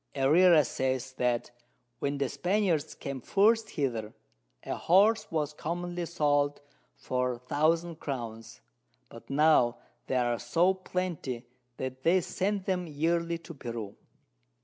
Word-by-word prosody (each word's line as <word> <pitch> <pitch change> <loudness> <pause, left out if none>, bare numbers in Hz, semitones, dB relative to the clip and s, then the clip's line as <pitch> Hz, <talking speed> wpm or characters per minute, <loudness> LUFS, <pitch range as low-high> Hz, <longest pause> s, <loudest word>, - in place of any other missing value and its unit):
Herrera 155 +4 +5
says, 130 -1 -2
that 120 -1 0 0.5
when 140 0 -1
the 140 -1 0
Spaniards 180 -2 0
came 140 -2 -6
first 220 - +3
hither, 115 -7 -3 0.5
a - - -3
Horse 210 +4 +3
was 150 -2 -1
commonly 175 +2 -4
sold 145 -3 +1 0.4
for 125 0 -1
1000 165 +3 +1
Crowns, 115 -5 -6 0.5
but - - -13
now 140 -4 +4 0.3
they 130 - -1
are 120 -1 +1
so 165 +10 +2
plenty 180 -10 -4 0.3
that 130 0 -5
they 170 +6 +4
send 190 +2 -2
them 180 -2 -1
yearly 165 +3 0
to 165 0 -11
Peru. 115 -7 -6
150 Hz, 125 wpm, -29 LUFS, 130-175 Hz, 0.5 s, Herrera